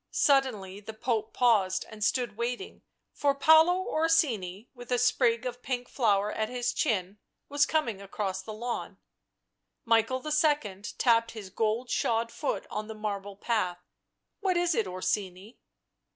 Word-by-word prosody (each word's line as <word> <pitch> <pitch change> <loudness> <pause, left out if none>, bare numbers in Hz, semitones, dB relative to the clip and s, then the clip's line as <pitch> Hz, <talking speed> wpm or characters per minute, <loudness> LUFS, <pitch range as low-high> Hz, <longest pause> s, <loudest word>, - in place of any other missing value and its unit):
Suddenly 230 -9 +1
the 215 +1 -9
Pope 225 -1 -1
paused 205 -7 +2
and 215 -1 -7
stood 240 -1 0
waiting, 240 - -4 0.3
for 280 -1 +1
Paolo 320 +6 +5
Orsini, 240 - +1
with 245 -1 -12
a 245 - +3
sprig 240 0 +2
of 245 0 -5
pink 250 -1 -3
flower 210 -4 +1
at 220 0 -2
his 245 0 -1
chin, 200 -6 -1 0.3
was 285 0 +3
coming 235 -11 -1
across 195 -1 -3
the 215 - -8
lawn. 235 +3 -5 0.9
Michael 230 +3 +2
II. 295 -10 +1 0.2
tapped 230 -2 +3
his 205 -4 -9
gold 225 +4 -1
shod 230 0 0
foot 295 - -3
on 215 0 -4
the 220 - -7
marble 205 -2 -4
path. 200 -4 -1 0.6
"What 375 -3 +1
is 350 -1 +2
it, 225 -8 0
Orsini?" 185 +3 -3
230 Hz, 145 wpm, -29 LUFS, 205-255 Hz, 0.9 s, Paolo